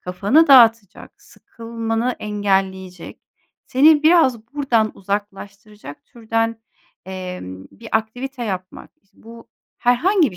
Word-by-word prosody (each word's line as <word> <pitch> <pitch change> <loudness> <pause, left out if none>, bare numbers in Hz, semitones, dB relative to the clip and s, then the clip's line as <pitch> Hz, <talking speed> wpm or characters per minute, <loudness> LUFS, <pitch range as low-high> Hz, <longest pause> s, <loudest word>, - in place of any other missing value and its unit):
Kafanı 205 - +1
dağıtacak 230 -6 +3
sıkılmanı 230 +1 -5
engelleyecek 190 -3 -3 0.5
seni 295 +3 +4
biraz 265 -9 +3
buradan 235 -7 0
uzaklaştıracak 200 -2 -7
türden, 225 -2 -3 0.4
emm, 180 - -8
bir 230 0 -13
aktivite 245 +4 -3
yapmak. 185 -3 -7
İş 195 - -40
bu 230 +1 -15 0.3
herhangi 305 - +2
bir 180 - -13
225 Hz, 100 wpm, -19 LUFS, 195-245 Hz, 0.5 s, seni